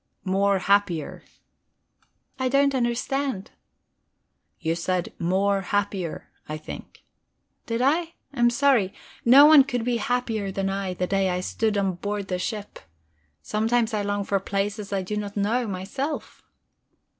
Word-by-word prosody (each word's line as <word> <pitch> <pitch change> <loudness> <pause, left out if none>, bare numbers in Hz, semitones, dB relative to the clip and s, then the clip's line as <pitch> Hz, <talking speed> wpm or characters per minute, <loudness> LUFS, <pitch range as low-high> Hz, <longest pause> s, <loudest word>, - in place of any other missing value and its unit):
"'More 195 +1 +2
happier.'" 190 -5 +1 1.2
"I 260 -1 +1
don't 275 +1 +3
understand." 250 -2 -1 1.1
"You 165 -2 0
said 175 +1 -2
'more 195 +3 +1
happier,' 195 -3 -2 0.2
I 155 - -3
think." 155 - -10 0.6
"Did 230 +1 -1
I? 325 +5 +1 0.2
I'm 240 -3 +4
sorry. 240 -6 +2 0.3
No 270 +5 +9
one 300 -2 +9
could 245 -3 -2
be 245 -1 +1
happier 225 -3 -1
than 195 0 -1
I 195 -2 -3
the 180 - -1
day 195 0 +1
I 180 0 -1
stood 215 +2 -1
on 195 -2 +1
board 205 +1 -4
the 180 -1 -1
ship. 205 +2 -5 0.6
Sometimes 225 +2 +1
I 210 - 0
long 205 0 -1
for 200 0 0
places 200 +1 -3
I 195 -1 -1
do 210 +3 -3
not 205 0 -5
know 225 +4 +1
myself." 205 +11 -4
205 Hz, 140 wpm, -25 LUFS, 195-240 Hz, 1.2 s, No